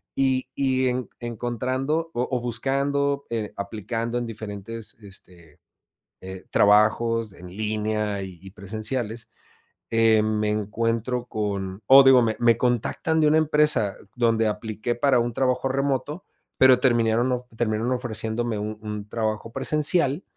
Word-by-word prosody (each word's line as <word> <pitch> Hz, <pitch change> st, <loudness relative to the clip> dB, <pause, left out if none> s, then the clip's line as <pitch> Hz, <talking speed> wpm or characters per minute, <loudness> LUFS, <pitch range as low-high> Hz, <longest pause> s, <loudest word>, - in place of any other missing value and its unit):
y 130 Hz, -1 st, +1 dB
y 130 Hz, -1 st, +1 dB
enc 125 Hz, 0 st, -3 dB
encontrando 130 Hz, +7 st, -2 dB
o 125 Hz, +1 st, -1 dB
o 125 Hz, -, 0 dB
buscando, 140 Hz, +3 st, -1 dB
eh, 110 Hz, -3 st, -3 dB
aplicando 115 Hz, +4 st, -3 dB
en 120 Hz, -, -2 dB
diferentes, 110 Hz, 0 st, -7 dB
este, 90 Hz, -5 st, -14 dB, 0.6 s
eh 95 Hz, 0 st, -8 dB
trabajos 110 Hz, +2 st, +3 dB
en 90 Hz, +1 st, -12 dB
línea 105 Hz, -1 st, -2 dB
y 95 Hz, -3 st, -8 dB
y 95 Hz, -1 st, -12 dB
presenciales, 110 Hz, +3 st, -5 dB, 0.6 s
eh, 115 Hz, -1 st, +4 dB
me 105 Hz, 0 st, 0 dB
encuentro 115 Hz, +3 st, -1 dB
con 100 Hz, -3 st, -3 dB
o 135 Hz, +1 st, +9 dB
digo, 130 Hz, -2 st, +7 dB
me 110 Hz, -1 st, +1 dB
me 115 Hz, -1 st, +4 dB
contactan 125 Hz, +6 st, 0 dB
de 155 Hz, -, +4 dB
una 155 Hz, +1 st, +4 dB
empresa 150 Hz, -9 st, +2 dB, 0.2 s
donde 115 Hz, -2 st, +2 dB
apliqué 110 Hz, +2 st, -3 dB
para 130 Hz, +1 st, +2 dB
un 120 Hz, 0 st, -1 dB
trabajo 130 Hz, +1 st, 0 dB
remoto, 140 Hz, +4 st, -1 dB, 0.4 s
pero 130 Hz, -1 st, +7 dB
terminaron, 120 Hz, -1 st, +2 dB
of 125 Hz, 0 st, -2 dB
terminaron 115 Hz, +1 st, 0 dB
ofreciéndome 115 Hz, -2 st, -3 dB
un 105 Hz, 0 st, -4 dB
un 105 Hz, -1 st, -6 dB
trabajo 110 Hz, 0 st, -2 dB
presencial 150 Hz, +2 st, 0 dB
115 Hz, 135 wpm, -24 LUFS, 105-130 Hz, 0.6 s, o